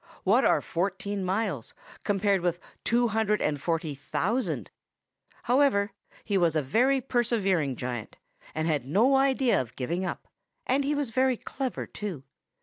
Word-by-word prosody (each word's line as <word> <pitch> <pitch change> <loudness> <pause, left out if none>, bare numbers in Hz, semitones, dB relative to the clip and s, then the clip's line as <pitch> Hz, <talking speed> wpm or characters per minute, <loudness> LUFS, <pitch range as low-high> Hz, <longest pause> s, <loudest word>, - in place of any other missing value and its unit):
What 230 +8 +4
are - - +4
fourteen 195 +3 -2
miles, 185 - -2 0.3
compared 200 -2 +2
with 175 -1 0 0.2
two 240 0 +2
hundred 215 -1 +1
and 145 -2 -1
forty 165 -3 -1
thousand? 165 - -2 0.7
However, 240 -6 +3 0.3
he 200 -3 +1
was 170 -3 +2
a 155 - +2
very 250 - +3
persevering 210 - +1
giant, 120 -3 -5 0.4
and 155 +1 0
had 150 -5 +1
no 230 - +4
idea 270 - +3
of 120 -1 -9
giving 170 +8 -2
up; - - -4 0.4
and 270 +2 +2
he 290 +2 0
was 285 -5 -1
very 260 +1 +2
clever 265 +1 -4
too. 185 -10 -6
200 Hz, 145 wpm, -28 LUFS, 160-240 Hz, 0.7 s, What